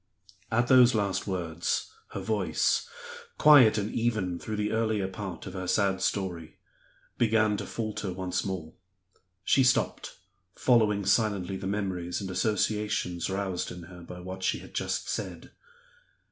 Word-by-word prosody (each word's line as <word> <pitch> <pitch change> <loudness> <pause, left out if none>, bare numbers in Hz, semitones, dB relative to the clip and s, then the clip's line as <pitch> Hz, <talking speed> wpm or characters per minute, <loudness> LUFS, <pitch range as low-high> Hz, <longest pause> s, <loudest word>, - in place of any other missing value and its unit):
At 120 +2 +2
those 125 -2 +6
last 100 -2 0
words 85 -3 -2 0.2
her - - -3
voice 100 -8 0 0.5
quiet 130 -8 +7
and 105 +1 -2
even 105 -7 -1
through 110 - -5
the 105 0 -1
earlier 110 -3 0
part 95 -1 -7
of 95 - -7
her 95 -2 -5
sad 95 0 +1
story 90 -5 -2 0.6
began 110 -2 +3
to - - -5
falter 110 -3 -4
once 90 0 -2
more. 90 -5 -5 0.7
She 135 - +4
stopped, 130 +1 +1 0.4
following 105 -5 +3
silently 100 -5 +1
the 95 0 -5
memories 95 -4 -2
and 95 -2 -5
associations 105 -4 0
roused 95 -2 -2
in 90 -1 -8
her 90 +1 -12
by 90 +1 -9
what 95 +1 -7
she 95 - +1
had - - -12
just - - -2
said. - - -5
100 Hz, 145 wpm, -28 LUFS, 90-110 Hz, 0.7 s, quiet